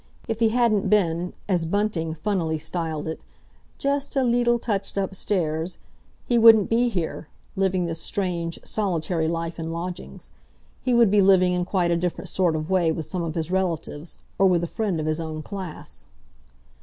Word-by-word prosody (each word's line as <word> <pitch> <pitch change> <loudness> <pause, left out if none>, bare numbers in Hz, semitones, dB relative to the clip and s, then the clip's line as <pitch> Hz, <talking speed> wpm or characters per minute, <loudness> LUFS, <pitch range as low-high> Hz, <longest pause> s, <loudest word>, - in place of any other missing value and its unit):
If 225 -1 -2
he 225 -1 +4
hadn't 220 -4 +2
been, 180 -4 +1
as 180 -4 +1
Bunting 175 -4 -1
funnily 165 -2 -1
styled 160 -1 -3
it, 160 - -5 0.6
"just 280 0 -1
a 270 - +3
leetle 240 0 +3
touched 200 -4 -3
upstairs," 185 -4 -1 0.5
he 240 -1 +2
wouldn't 225 -3 +7
be 240 +2 +3
here, 175 -6 -3 0.3
living 190 -2 +1
this 165 -1 -3
strange, 170 -4 -2
solitary 175 -5 -1
life 165 +1 -3
in 165 0 -4
lodgings. 175 +2 -6 0.5
He 250 -2 +1
would 235 -4 +5
be 205 -1 +5
living 185 -2 +5
in 180 0 0
quite 180 -2 +1
a 170 - +2
different 175 0 -3
sort 175 -4 +1
of 155 0 -3
way 175 -4 +3
with 160 -1 -3
some 175 +4 -4
of 165 -2 -3
his 165 0 -2
relatives, 170 -4 -2 0.2
or 195 - +6
with 175 -2 +2
a - - -1
friend 200 -3 -2
of 155 - -2
his 155 +1 0
own 155 -1 -5
class. 185 - -8
180 Hz, 175 wpm, -24 LUFS, 165-205 Hz, 0.6 s, wouldn't